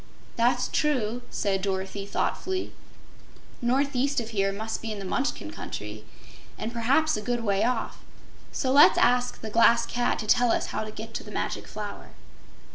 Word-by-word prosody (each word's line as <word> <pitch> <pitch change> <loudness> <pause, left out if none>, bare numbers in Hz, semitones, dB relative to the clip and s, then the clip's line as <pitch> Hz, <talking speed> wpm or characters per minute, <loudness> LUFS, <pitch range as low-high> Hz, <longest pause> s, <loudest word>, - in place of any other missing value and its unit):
"That's 245 +1 +2
true," 245 -6 0
said 195 -2 -1
Dorothy, 195 +1 -3
thoughtfully. 375 - -2 0.9
"Northeast 275 +2 +1
of 230 -1 -5
here 195 -3 +1
must 220 +3 -4
be 225 - -4
in 215 - -4
the 195 - -6
Munchkin 185 - -2
Country, 105 +1 -7 0.5
and 230 - -4
perhaps 270 +7 +2
a 210 - -3
good 240 +1 -2
way 200 -2 +1
off, 245 -2 -1 0.5
so 260 - -1
let's 280 +2 +7
ask 245 0 +2
the 220 - -6
Glass 235 +1 +5
Cat 245 +1 0
to 215 - -4
tell 245 +2 +4
us - - +1
how 215 - -1
to 215 - -6
get 220 +1 -8
to - - -4
the - - -11
Magic - - -3
Flower." 210 -1 -8
230 Hz, 170 wpm, -27 LUFS, 205-245 Hz, 0.9 s, let's